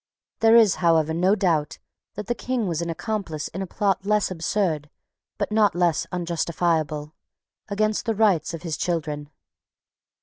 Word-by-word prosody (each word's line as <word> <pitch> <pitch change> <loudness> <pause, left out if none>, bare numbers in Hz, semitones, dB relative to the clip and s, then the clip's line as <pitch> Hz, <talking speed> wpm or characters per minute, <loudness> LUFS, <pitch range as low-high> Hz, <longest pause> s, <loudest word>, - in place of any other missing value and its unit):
There 225 0 +5
is 225 -5 +6
however 160 -2 +3
no 185 +5 +3
doubt 165 -7 0 0.4
that 210 - -5
the 240 - 0
King 245 -1 -2
was 170 -3 -2
an 170 - -3
accomplice 170 -3 -3
in 190 - -6
a 190 - -3
plot 195 0 0
less 210 -1 +1
absurd, 165 -3 -1 0.5
but - - -2
not 210 -4 +3
less 175 -2 +1
unjustifiable, 165 -3 -1 0.5
against 215 +2 -1
the 225 - +1
rights 195 -7 +2
of 165 - -10
his 160 -3 -3
children. 150 -4 -2
175 Hz, 155 wpm, -24 LUFS, 160-210 Hz, 0.5 s, is